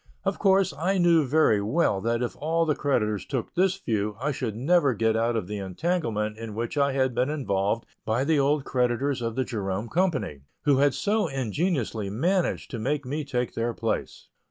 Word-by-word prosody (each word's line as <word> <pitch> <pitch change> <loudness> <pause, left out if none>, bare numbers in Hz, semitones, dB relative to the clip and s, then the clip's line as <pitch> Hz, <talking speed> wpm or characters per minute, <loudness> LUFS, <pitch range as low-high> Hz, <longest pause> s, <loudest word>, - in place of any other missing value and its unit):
Of 195 0 -1
course, 195 -1 +3
I 185 +6 0
knew 170 -5 +4
very 135 -7 +3
well 105 - +1
that 115 +2 0
if 120 - -3
all 165 +2 +1
the 155 - +2
creditors 105 -10 0
took 130 -5 -4
this 185 +1 +2
view 105 - -2
I 145 +4 0
should 120 -6 -3
never 140 +1 +3
get 110 +1 +1
out 115 +1 +1
of 110 - -1
the 105 +2 -5
entanglement 110 - -2
in 115 -2 -6
which 120 +6 -3
I 140 -1 +2
had 130 -2 +1
been 125 +3 +1
involved 110 -7 -1 0.2
by 115 +4 0
the 155 +1 +2
old 140 0 +2
creditors 125 +1 0
of 115 -1 -2
the 130 - 0
Jerome 100 -1 -3
Company, 160 - 0 0.2
who 145 -2 +4
had 140 -1 +3
so 210 -1 +1
ingeniously 130 - -1
managed 175 - 0
to 120 - -4
make 140 +5 -1
me 150 +4 -3
take 125 -4 -2
their 115 0 -2
place. 115 -1 -3
130 Hz, 195 wpm, -26 LUFS, 110-155 Hz, 0.2 s, knew